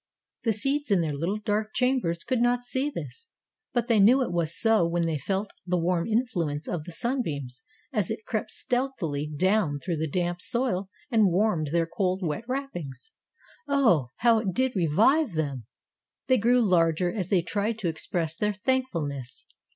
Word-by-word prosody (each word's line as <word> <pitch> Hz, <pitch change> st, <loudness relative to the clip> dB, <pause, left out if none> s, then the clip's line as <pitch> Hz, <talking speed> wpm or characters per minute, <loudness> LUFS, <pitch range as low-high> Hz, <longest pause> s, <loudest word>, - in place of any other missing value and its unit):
The 225 Hz, -, +3 dB
seeds 275 Hz, +7 st, -1 dB
in 195 Hz, -4 st, +3 dB
their 155 Hz, -3 st, -1 dB
little 170 Hz, +8 st, -1 dB
dark 215 Hz, 0 st, -2 dB
chambers 250 Hz, -10 st, +1 dB
could 255 Hz, -3 st, 0 dB
not 245 Hz, 0 st, +2 dB
see 260 Hz, +4 st, -1 dB
this, 460 Hz, +9 st, -8 dB, 0.4 s
but 240 Hz, -2 st, 0 dB
they 230 Hz, -4 st, +3 dB
knew 245 Hz, +7 st, +6 dB
it 240 Hz, -, -3 dB
was 170 Hz, -1 st, +1 dB
so 225 Hz, -4 st, +4 dB
when 170 Hz, 0 st, 0 dB
they 160 Hz, -3 st, -1 dB
felt 195 Hz, +7 st, -2 dB
the 180 Hz, 0 st, 0 dB
warm 170 Hz, 0 st, 0 dB
influence 185 Hz, -, -1 dB
of 160 Hz, -4 st, -3 dB
the 175 Hz, -, -8 dB
sunbeams 155 Hz, -, -3 dB, 0.3 s
as 210 Hz, -7 st, 0 dB
it 220 Hz, -, -5 dB
crept 215 Hz, -1 st, -2 dB
stealthily 220 Hz, -, -2 dB
down 175 Hz, 0 st, +1 dB
through 170 Hz, +3 st, -3 dB
the 160 Hz, 0 st, -2 dB
damp 175 Hz, +2 st, -1 dB
soil 235 Hz, -7 st, 0 dB, 0.2 s
and 220 Hz, -3 st, +5 dB
warmed 180 Hz, -4 st, +1 dB
their 165 Hz, +3 st, +1 dB
cold, 185 Hz, +2 st, -1 dB
wet 165 Hz, +7 st, -2 dB
wrappings. 255 Hz, -, -5 dB, 0.6 s
Oh, 240 Hz, -, +3 dB
how 230 Hz, -1 st, +4 dB
it 200 Hz, -4 st, -2 dB
did 260 Hz, -1 st, +1 dB
revive 210 Hz, -, +3 dB
them! 140 Hz, -8 st, -3 dB, 0.6 s
They 255 Hz, -2 st, +3 dB
grew 240 Hz, +2 st, +3 dB
larger 175 Hz, -1 st, +2 dB
as 190 Hz, -5 st, -3 dB
they 180 Hz, -4 st, +3 dB
tried 210 Hz, +4 st, -1 dB
to 200 Hz, -5 st, -2 dB
express 165 Hz, 0 st, -2 dB
their 210 Hz, +3 st, 0 dB
thankfulness. 170 Hz, -, -2 dB
195 Hz, 175 wpm, -27 LUFS, 165-240 Hz, 0.6 s, knew